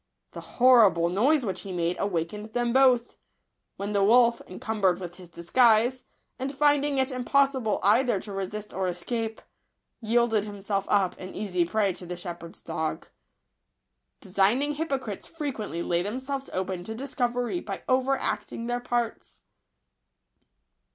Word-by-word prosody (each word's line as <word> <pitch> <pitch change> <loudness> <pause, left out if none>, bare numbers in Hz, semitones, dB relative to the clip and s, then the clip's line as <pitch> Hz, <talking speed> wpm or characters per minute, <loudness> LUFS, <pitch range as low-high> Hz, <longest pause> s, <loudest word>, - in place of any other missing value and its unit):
The - - -8 0.2
horrible 220 -10 +6
noise 255 - +2
which 190 - -2
he 195 - -7
made 175 0 -1
awakened 200 +3 -3
them 240 -1 0
both; 255 -3 +3 0.6
when 200 +1 -4
the 200 -1 +2
wolf, 235 +2 +5
encumbered 190 -2 0
with 175 -2 -8
his 180 -2 -13
disguise, 230 +8 +3 0.3
and 265 +1 -2
finding 290 0 +2
it 265 +1 +1
impossible 260 -2 +1
either 225 +2 +3
to 210 - -9
resist 200 +2 -5
or 190 0 -1
escape, 220 +5 -4 0.6
yielded 225 -2 +2
himself 200 -1 -3
up 195 -3 +1
an 185 0 -8
easy 180 -4 0
prey 200 +1 +1
to 180 0 -11
the 180 0 -5
shepherd's 170 -1 -8
dog. 160 -1 -4 1.1
Designing 210 +10 +1
hypocrites 275 -9 -4
frequently 245 - -4
lay 170 0 0
them 210 +7 -3
selves 270 0 -5
open 185 -1 -3
to 220 - -5
discovery 245 +2 -2
by - - -6
over 260 0 +2
acting 230 - -3
their 240 +1 -1
parts. 240 -2 -3
220 Hz, 140 wpm, -27 LUFS, 190-255 Hz, 1.1 s, horrible